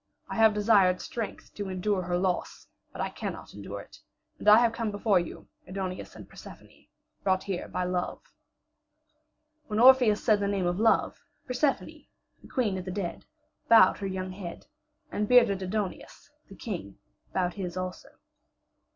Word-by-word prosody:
I -, -, -4 dB
have 220 Hz, -1 st, +5 dB
desired 200 Hz, -4 st, +4 dB
strength 230 Hz, -3 st, -6 dB
to 205 Hz, -2 st, -5 dB
endure 185 Hz, +1 st, -1 dB
her 175 Hz, 0 st, -1 dB
loss, 180 Hz, -1 st, -2 dB, 0.3 s
but -, -, -6 dB
I -, -, -1 dB
cannot -, -, -6 dB
endure -, -, -7 dB
it. -, -, -16 dB, 0.4 s
And 210 Hz, -, +3 dB
I 225 Hz, +3 st, +8 dB
come 230 Hz, -1 st, -3 dB
before 205 Hz, -1 st, +2 dB
you, 175 Hz, -, -7 dB, 0.2 s
Aidoneus 185 Hz, 0 st, -5 dB
and -, -, -11 dB
Persephone, -, -, -14 dB, 0.4 s
brought 190 Hz, -1 st, +1 dB
here 190 Hz, -3 st, -4 dB
by 180 Hz, -, -2 dB
Love." 180 Hz, 0 st, -2 dB, 1.5 s
When 210 Hz, -, -3 dB
Orpheus 250 Hz, -4 st, +6 dB
said 215 Hz, -1 st, +4 dB
the 200 Hz, -, 0 dB
name 200 Hz, -2 st, 0 dB
of 175 Hz, +2 st, 0 dB
Love, 225 Hz, 0 st, +2 dB, 0.2 s
Persephone, 265 Hz, +2 st, -1 dB, 0.3 s
the -, -, -14 dB
queen 210 Hz, -8 st, -1 dB
of 180 Hz, -, -8 dB
the -, -, -5 dB
dead, 180 Hz, -3 st, -4 dB, 0.4 s
bowed 220 Hz, -5 st, +7 dB
her 200 Hz, -, -3 dB
young 185 Hz, 0 st, -4 dB
head, 185 Hz, -2 st, -8 dB, 0.5 s
and 210 Hz, 0 st, -1 dB
bearded 235 Hz, -6 st, +5 dB
Aidoneus, 205 Hz, +8 st, -5 dB, 0.2 s
the 195 Hz, -, -11 dB
king, 175 Hz, -, -6 dB, 0.3 s
bowed 180 Hz, -1 st, 0 dB
his 185 Hz, -4 st, -5 dB
head 185 Hz, -, -2 dB
also. 185 Hz, 0 st, -7 dB
195 Hz, 160 wpm, -28 LUFS, 185-215 Hz, 1.5 s, I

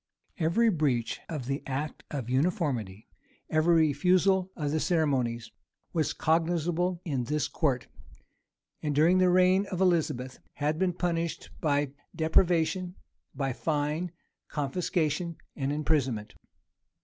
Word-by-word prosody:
Every 175 Hz, +8 st, +3 dB
breach 140 Hz, -, 0 dB
of 150 Hz, -7 st, -4 dB
the 135 Hz, +2 st, -2 dB
act 140 Hz, +3 st, -4 dB
of 135 Hz, -6 st, -4 dB
uniformity, 130 Hz, -, -1 dB, 0.4 s
every 160 Hz, 0 st, +4 dB
refusal 185 Hz, +5 st, +2 dB
of 150 Hz, -3 st, -2 dB
the 155 Hz, -, +1 dB
ceremonies, 130 Hz, -10 st, 0 dB, 0.4 s
was 160 Hz, -3 st, +1 dB
cognizable 170 Hz, +2 st, +1 dB
in 135 Hz, -7 st, -1 dB
this 150 Hz, +4 st, 0 dB
court; 135 Hz, -7 st, 0 dB, 1.0 s
and, 150 Hz, -2 st, -1 dB
during 170 Hz, +5 st, +5 dB
the 185 Hz, 0 st, +5 dB
reign 185 Hz, +2 st, +4 dB
of 185 Hz, -, -4 dB
Elizabeth, 155 Hz, -8 st, +1 dB
had 150 Hz, +2 st, -1 dB
been 185 Hz, -2 st, +2 dB
punished 170 Hz, -2 st, -2 dB
by 145 Hz, -3 st, +1 dB, 0.2 s
deprivation, 170 Hz, +2 st, +2 dB, 0.4 s
by 135 Hz, -1 st, -1 dB
fine, 155 Hz, +4 st, -1 dB, 0.4 s
confiscation, 160 Hz, +2 st, -1 dB, 0.2 s
and 135 Hz, -1 st, -1 dB
imprisonment. 140 Hz, -8 st, 0 dB
155 Hz, 115 wpm, -29 LUFS, 140-175 Hz, 1.0 s, during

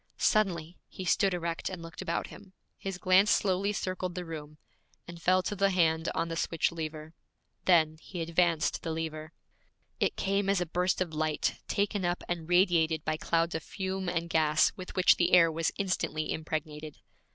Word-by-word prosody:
Suddenly 180 Hz, -6 st, +1 dB
he 185 Hz, -, -8 dB
stood 195 Hz, +2 st, +3 dB
erect 170 Hz, -2 st, -3 dB
and 185 Hz, -2 st, -6 dB
looked 165 Hz, 0 st, -9 dB
about 170 Hz, -, -2 dB
him. 190 Hz, -2 st, -14 dB, 0.3 s
His 195 Hz, -2 st, -4 dB
glance 185 Hz, +3 st, +4 dB
slowly 195 Hz, +1 st, +2 dB
circled 185 Hz, -3 st, -3 dB
the 180 Hz, -1 st, -4 dB
room, 155 Hz, -2 st, -8 dB, 0.5 s
and 170 Hz, -1 st, -10 dB
fell 185 Hz, +1 st, +3 dB
to 205 Hz, -, -3 dB
the 195 Hz, 0 st, +3 dB
hand 160 Hz, -3 st, +2 dB
on -, -, 0 dB
the 165 Hz, -, -4 dB
switch 165 Hz, 0 st, 0 dB
lever. 155 Hz, -1 st, -6 dB, 0.5 s
Then 160 Hz, -3 st, +4 dB
he 180 Hz, -, -8 dB
advanced 165 Hz, -2 st, +1 dB
the 165 Hz, -, -4 dB
lever. 160 Hz, -1 st, -4 dB, 0.7 s
It -, -, +1 dB
came 195 Hz, 0 st, 0 dB
as 200 Hz, -2 st, +3 dB
a 180 Hz, -, 0 dB
burst 180 Hz, +3 st, 0 dB
of 170 Hz, -3 st, -2 dB
light 155 Hz, 0 st, -1 dB
taken 200 Hz, -1 st, 0 dB
up 175 Hz, 0 st, -1 dB
and 170 Hz, -2 st, -4 dB
radiated 170 Hz, -4 st, +3 dB
by 155 Hz, 0 st, 0 dB
clouds 165 Hz, +1 st, 0 dB
of 160 Hz, -, -2 dB
fume 190 Hz, +2 st, -4 dB
and 170 Hz, -1 st, -2 dB
gas 160 Hz, -1 st, +3 dB
with 185 Hz, -1 st, -9 dB
which 185 Hz, -, +5 dB
the 175 Hz, +1 st, +1 dB
air 170 Hz, -2 st, +7 dB
was 165 Hz, +1 st, 0 dB
instantly 185 Hz, -5 st, -1 dB
impregnated. 155 Hz, -1 st, -5 dB
170 Hz, 180 wpm, -30 LUFS, 160-185 Hz, 0.7 s, air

